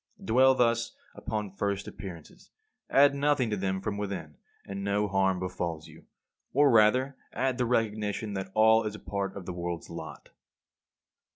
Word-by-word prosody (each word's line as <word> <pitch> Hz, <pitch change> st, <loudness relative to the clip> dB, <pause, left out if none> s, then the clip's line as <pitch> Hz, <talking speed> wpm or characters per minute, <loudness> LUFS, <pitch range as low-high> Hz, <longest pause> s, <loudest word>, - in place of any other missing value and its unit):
Dwell 130 Hz, +4 st, +5 dB
thus 115 Hz, -2 st, +1 dB, 0.2 s
upon 105 Hz, -3 st, -4 dB
first 100 Hz, 0 st, -2 dB
appearances; 85 Hz, -5 st, -10 dB, 0.4 s
add 140 Hz, +1 st, +6 dB
nothing 140 Hz, -4 st, +1 dB
to -, -, +1 dB
them 95 Hz, -1 st, -2 dB
from 100 Hz, 0 st, -3 dB
within, 95 Hz, -7 st, -5 dB, 0.3 s
and 100 Hz, 0 st, -5 dB
no 100 Hz, +1 st, +1 dB
harm 95 Hz, -1 st, +2 dB
befalls 90 Hz, -3 st, -4 dB
you: -, -, -16 dB, 0.5 s
or 145 Hz, 0 st, +5 dB
rather 125 Hz, +5 st, +4 dB, 0.2 s
add 130 Hz, +1 st, -1 dB
the 125 Hz, -, +1 dB
recognition 110 Hz, -2 st, -1 dB
that 95 Hz, -1 st, -4 dB
all 110 Hz, +1 st, +5 dB
is 105 Hz, 0 st, -5 dB
part 100 Hz, -1 st, -4 dB
of 95 Hz, -, -8 dB
the 90 Hz, -, -5 dB
world's 85 Hz, -1 st, -5 dB
lot. -, -, -8 dB
105 Hz, 155 wpm, -29 LUFS, 95-115 Hz, 0.5 s, add